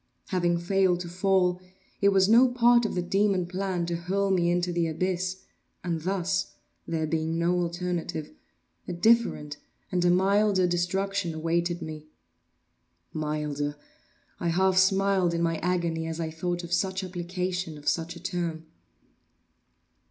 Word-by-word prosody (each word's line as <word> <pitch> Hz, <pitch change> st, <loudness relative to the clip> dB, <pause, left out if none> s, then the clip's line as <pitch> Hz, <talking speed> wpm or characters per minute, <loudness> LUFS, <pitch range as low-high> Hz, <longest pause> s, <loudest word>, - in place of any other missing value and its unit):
Having 175 Hz, -2 st, +1 dB
failed 180 Hz, 0 st, +2 dB
to 175 Hz, -, -6 dB
fall, 180 Hz, 0 st, +1 dB, 0.4 s
it 200 Hz, -, +5 dB
was 190 Hz, -1 st, +4 dB
no 235 Hz, +4 st, +6 dB
part 240 Hz, -1 st, +4 dB
of -, -, -5 dB
the 180 Hz, -, 0 dB
demon 195 Hz, 0 st, +1 dB
plan 185 Hz, -1 st, -2 dB
to 170 Hz, 0 st, -2 dB
hurl 195 Hz, +3 st, -1 dB
me 175 Hz, -2 st, +2 dB
into 175 Hz, 0 st, 0 dB
the 170 Hz, -1 st, +1 dB
abyss; 185 Hz, +3 st, -2 dB, 0.4 s
and 170 Hz, -3 st, -2 dB
thus 190 Hz, +2 st, -1 dB, 0.3 s
(there 160 Hz, -1 st, -1 dB
being 160 Hz, +1 st, -1 dB
no 175 Hz, +2 st, +1 dB
alternative) 175 Hz, -3 st, -3 dB, 0.6 s
a 180 Hz, -, -3 dB
different 175 Hz, -7 st, +2 dB, 0.3 s
and 180 Hz, -2 st, +1 dB
a 175 Hz, -, +4 dB
milder 195 Hz, +1 st, +3 dB
destruction 180 Hz, 0 st, -1 dB
awaited 170 Hz, +1 st, -1 dB
me. 155 Hz, -1 st, -8 dB, 1.1 s
Milder! 150 Hz, -1 st, -2 dB, 0.6 s
I 175 Hz, -, -2 dB
half 190 Hz, +3 st, +2 dB
smiled 190 Hz, -2 st, +3 dB
in 170 Hz, -, 0 dB
my 165 Hz, -1 st, +1 dB
agony 170 Hz, -2 st, -1 dB
as 165 Hz, 0 st, -4 dB
I 160 Hz, -1 st, -2 dB
thought 175 Hz, +2 st, -3 dB
of 170 Hz, 0 st, -5 dB
such 190 Hz, +2 st, 0 dB
application 180 Hz, -2 st, -3 dB
of 145 Hz, -, -12 dB
such 165 Hz, 0 st, 0 dB
a -, -, -9 dB
term. 170 Hz, -3 st, -3 dB
175 Hz, 145 wpm, -27 LUFS, 170-190 Hz, 1.1 s, no